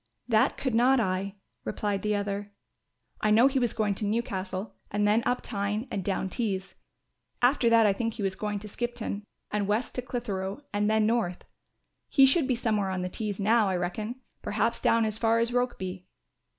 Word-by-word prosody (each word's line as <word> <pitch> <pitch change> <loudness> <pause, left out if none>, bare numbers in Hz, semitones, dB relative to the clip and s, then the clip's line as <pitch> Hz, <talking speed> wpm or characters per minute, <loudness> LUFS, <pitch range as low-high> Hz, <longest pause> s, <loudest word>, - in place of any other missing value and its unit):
"That 220 -3 +3
could 260 -3 -1
not 250 +3 +5
I," 195 -1 -1 0.3
replied 205 -2 -2
the 210 0 0
other. 205 0 -3 0.7
"I 215 - +2
know 220 +4 +6
he 270 0 +3
was 240 -3 +1
going 210 -2 0
to 210 - -4
Newcastle 200 -2 -2 0.2
and 205 0 +1
then 215 +3 +4
up 250 - 0
Tyne 210 +3 -2
and 195 - -2
down 190 0 -1
Tees; 190 -3 -2 0.7
after 245 -1 +4
that 230 -1 +6
I 205 - +4
think 230 +2 -2
he 205 - -4
was 195 -1 0
going 210 -1 -2
to 210 - -8
Skipton 240 -2 -4 0.3
and 205 -1 0
West 215 +4 0
to 250 - -2
Clitheroe 220 -2 -4
and 205 +1 +1
then 220 0 +3
North. 220 -6 0 0.6
He 270 - +7
should 270 +1 +4
be 255 - +2
somewhere 215 -4 0
on 185 -1 -2
the 180 - -2
Tees 210 +1 -4
now, 215 0 +3
I 190 - 0
reckon, 210 +7 -3 0.3
perhaps 230 +3 0
down 230 -1 +3
as 215 0 -2
far 225 0 +3
as 230 +1 +1
Rokeby." 190 -7 -2
210 Hz, 190 wpm, -28 LUFS, 200-235 Hz, 0.7 s, He